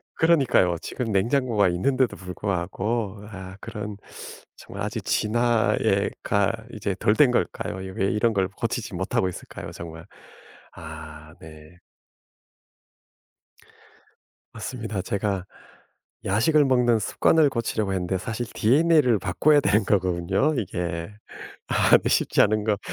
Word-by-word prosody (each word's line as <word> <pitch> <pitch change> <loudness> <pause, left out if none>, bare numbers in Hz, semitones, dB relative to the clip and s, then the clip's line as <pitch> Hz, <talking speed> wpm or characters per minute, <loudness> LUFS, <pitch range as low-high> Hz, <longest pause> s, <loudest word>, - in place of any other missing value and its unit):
그러니까요. 135 - +3
지금 120 -4 -4
냉장고가 110 0 +2
있는데도 130 +8 +1
불구하고 100 +3 -3
아 95 -2 -9
그런 105 -2 -6 0.6
정말 - - -8
아직 - - -4
진화에 120 +1 +1
가 100 0 +2 0.2
이제 100 -3 -3
덜 105 - +3
된 135 -2 +5
걸까요? 120 - -1 0.2
왜 95 - 0
이런 115 +3 +1
걸 95 -2 +1
고치지 95 - -4
못 - - -4
하고 95 - +2
있을까요 90 - -9
정말. 80 0 -9 0.7
아. 80 -1 -10
네. 80 +1 -14 2.8
맞습니다. 110 -6 -5
제가 100 -1 -2 0.8
야식을 140 +10 +3
먹는 125 -3 +3
습관을 150 +8 +3
고치려고 110 -5 -2
했는데 95 0 -1
사실 110 +5 -4
DNA를 135 -1 +3
바꿔야 145 - +3
되는 105 -2 +2
거군요 95 - +1
이게. 90 -4 -3 0.6
아 - - +5
쉽지 - - +3
않은 110 0 +2
거 105 -2 +1
105 Hz, 255 characters per minute, -24 LUFS, 95-120 Hz, 2.8 s, 된